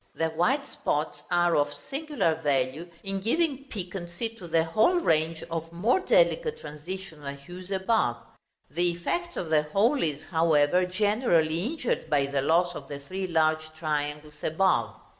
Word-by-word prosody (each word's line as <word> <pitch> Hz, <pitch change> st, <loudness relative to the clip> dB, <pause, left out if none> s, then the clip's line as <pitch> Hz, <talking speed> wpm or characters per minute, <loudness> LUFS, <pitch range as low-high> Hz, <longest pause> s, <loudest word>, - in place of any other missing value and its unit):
The 160 Hz, 0 st, 0 dB
white 245 Hz, -, +1 dB
spots 150 Hz, -, -2 dB
are 175 Hz, -1 st, +3 dB
of 145 Hz, 0 st, +2 dB
singular 280 Hz, -, -1 dB
value 145 Hz, +1 st, -1 dB
in 195 Hz, 0 st, -2 dB
giving 275 Hz, -, 0 dB
piquancy 180 Hz, -2 st, -5 dB
to 225 Hz, -6 st, -11 dB
the 165 Hz, 0 st, +3 dB
whole 215 Hz, -, +3 dB
range 160 Hz, -, +1 dB
of 165 Hz, 0 st, -3 dB
more 210 Hz, -, +2 dB
delicate -, -, +2 dB
transitional 150 Hz, -2 st, -7 dB
hues 175 Hz, +6 st, -11 dB
above. 190 Hz, -, +1 dB, 0.5 s
The 175 Hz, +3 st, +1 dB
effect 345 Hz, -, -3 dB
of 165 Hz, -3 st, -4 dB
the 155 Hz, -1 st, +5 dB
whole 210 Hz, -, +2 dB
is, 150 Hz, -2 st, -1 dB
however, 160 Hz, +1 st, +3 dB
generally 180 Hz, -5 st, +2 dB
injured 255 Hz, -, -2 dB
by 145 Hz, -2 st, +3 dB
the 140 Hz, 0 st, -1 dB
loss 175 Hz, +5 st, +2 dB
of 140 Hz, -5 st, -8 dB
the 140 Hz, -, -5 dB
three 185 Hz, +7 st, -5 dB
large 155 Hz, -2 st, +2 dB
triangles 150 Hz, -1 st, -3 dB
above. 185 Hz, +4 st, +2 dB
170 Hz, 150 wpm, -27 LUFS, 155-200 Hz, 0.5 s, the